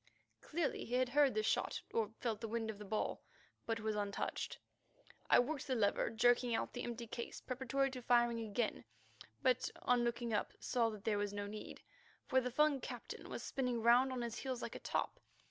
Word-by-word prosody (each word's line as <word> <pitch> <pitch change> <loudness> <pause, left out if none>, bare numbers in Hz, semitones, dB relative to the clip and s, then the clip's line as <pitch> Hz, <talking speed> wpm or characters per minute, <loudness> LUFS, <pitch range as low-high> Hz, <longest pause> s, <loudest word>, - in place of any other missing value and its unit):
Clearly 320 -2 -1
he 245 - -2
had 255 0 +2
heard 285 +1 +4
the 435 - +2
shot - - 0
or 220 -3 +1
felt 225 -3 -1
the 225 - -2
wind 225 0 -1
of 205 - -12
the 210 - -7
ball, 215 +2 -1 0.5
but 225 0 0
was 220 0 -1
untouched. 205 -1 -2 0.7
I - - +8
worked 280 +4 +1
the 260 - +1
lever 205 -3 +2
jerking 240 +1 +3
out - - -2
the 245 - -4
empty 235 0 -4
case, 235 +1 -5
preparatory 265 +1 0
to 255 -1 -6
firing 240 -1 +3
again, 220 - -1 0.6
but 255 0 +3
on 245 -1 +4
looking 235 -1 -1
up 210 - 0
saw 235 -3 +1
that 210 -2 -8
there 210 -2 +1
was 205 0 -1
no 205 0 -3
need, 210 +1 -8 0.4
for 260 - +3
the 250 - -1
Fung 295 +2 +3
captain - - -7
was - - -5
spinning 250 -4 -1
round 245 +3 +6
on 250 -2 -2
his 235 -1 -4
heels 260 -2 -3
like - - -4
a - - -6
top. - - -2
240 Hz, 200 wpm, -37 LUFS, 220-255 Hz, 0.7 s, I